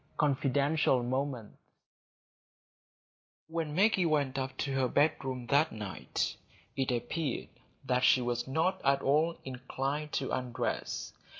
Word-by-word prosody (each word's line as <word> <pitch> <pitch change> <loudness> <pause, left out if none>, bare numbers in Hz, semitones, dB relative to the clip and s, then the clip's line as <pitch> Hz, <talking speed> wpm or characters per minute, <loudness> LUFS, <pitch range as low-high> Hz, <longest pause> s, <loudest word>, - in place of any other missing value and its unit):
Confidential 140 -1 +2
Moments 130 -3 -3 1.9
When 160 -2 -3
Maggie 195 -2 +4
went 145 -4 +1
up 130 0 -4
to 140 - -2
her 135 -1 +2
bedroom 135 -3 +1
that 145 +5 +3
night, 105 -3 -3 0.4
it 135 -2 0
appeared 125 +4 -2 0.4
that 125 0 +1
she - - +6
was 120 0 -1
not 165 +7 +1
at 140 0 +3
all 155 +4 +2
inclined 135 +3 -3
to 135 - -1
undress. 125 -2 -2
135 Hz, 115 wpm, -31 LUFS, 125-150 Hz, 1.9 s, she